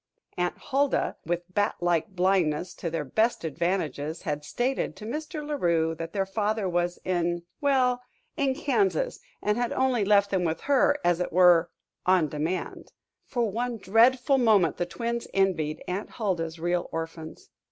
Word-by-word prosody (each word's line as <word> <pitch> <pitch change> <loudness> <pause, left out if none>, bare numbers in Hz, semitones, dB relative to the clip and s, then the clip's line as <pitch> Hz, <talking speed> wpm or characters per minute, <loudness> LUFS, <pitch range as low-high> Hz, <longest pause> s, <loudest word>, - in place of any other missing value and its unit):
Aunt 180 0 -1
Huldah, 280 +1 0
with 175 0 -1
bat 205 +1 +1
like 175 -2 +1
blindness 180 -2 +1
to 170 - -4
their 165 -2 -2
best 220 - +1
advantages, 160 -2 -2
had 150 -4 -3
stated 250 - -1
to 215 - -10
Mr. 300 +5 -5
La 300 - -2
Rue 165 -3 +2
that 165 +1 -6
their 195 0 0
father 210 +1 -1
was 175 0 0
in 175 -1 0 0.2
well 255 -3 +2 0.3
in 275 -3 +1
Kansas, 390 - 0 0.2
and 210 +2 +1
had 245 -1 0
only 260 -4 +1
left 200 0 +3
them 190 -2 +1
with 160 -1 -1
her, 285 +1 +3
as 175 -1 +3
it 180 - -2
were, 175 -1 +5 0.3
"on 180 -4 +3
demand." 155 +5 -4 0.3
For 240 -2 0
one 240 +2 -2
dreadful 245 +7 +4
moment 205 - +4
the 175 - -1
twins 235 +4 -3
envied 175 -6 +1
Aunt 185 +3 -3
Huldah's 170 -7 -2
real 175 +1 -1
orphans. 165 0 -6
185 Hz, 160 wpm, -27 LUFS, 170-240 Hz, 0.3 s, were